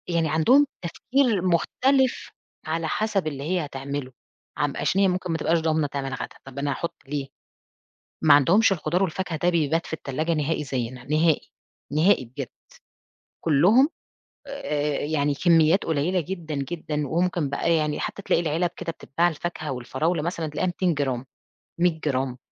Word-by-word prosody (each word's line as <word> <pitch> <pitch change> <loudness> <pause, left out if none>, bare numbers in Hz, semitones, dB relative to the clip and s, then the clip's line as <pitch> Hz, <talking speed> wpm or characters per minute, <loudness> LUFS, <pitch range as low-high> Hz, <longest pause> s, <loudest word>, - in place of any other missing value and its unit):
يعني 170 -2 +1
عندهم 245 - +5 0.2
التفكير 245 +3 +1
مُختلف 255 +9 +1 0.4
على 160 +1 -1
حسب 205 -1 0
اللي 140 -2 -4
هي 175 +1 0
هتعملُه، 140 -1 -5 0.5
عم - - 0
عشان 195 - +1
هي 195 - +5
ممكن 180 -1 -1
ما 165 - 0
تبقاش 165 +2 +2
ضامنة 160 -2 +1
تعمل 135 -1 -4
غدا، - - -6
طَب 135 +1 -8
أنا 140 0 -1
هاحُط 170 +5 -3
ليه؟ 140 -1 -3 1.0
ما 150 -2 +7
عندهمش 185 - +5
الخضار 175 +1 0
والفاكهة 185 -2 -2
ده 175 - +3
بيبات 165 -1 +1
في - - -10
التلاجة 155 +2 -2
نهائي 150 0 -1
زيّنا، 125 -2 -4
نهائي، 155 +3 +1 0.4
نهائي 155 -1 +4
بجد، 130 +2 -7 0.9
كلّهم 185 - +5 0.6
آآ، 150 - -2
يعني 145 -1 0
كميّات 165 +3 +4
قليّلة 165 +4 +1
جدًا 165 -2 -5
جدًا، 150 +1 -3
وممكن 170 -1 0
بقى 155 +4 +1
يعني 150 -2 0
حتى - - -4
تلاقي 175 - +2
العِلَب 170 +2 0
كده 165 - -3
بتتباع 165 +2 0
الفاكهة 165 -2 -4
والفراولة 135 +7 -1
مثلًا 170 0 -2
تلاقيها 150 +5 -1
200 180 0 +1
جرام، 135 -4 -2 0.5
100 170 -2 +1
جرام، 130 -3 -1
160 Hz, 155 wpm, -25 LUFS, 145-175 Hz, 1.0 s, ما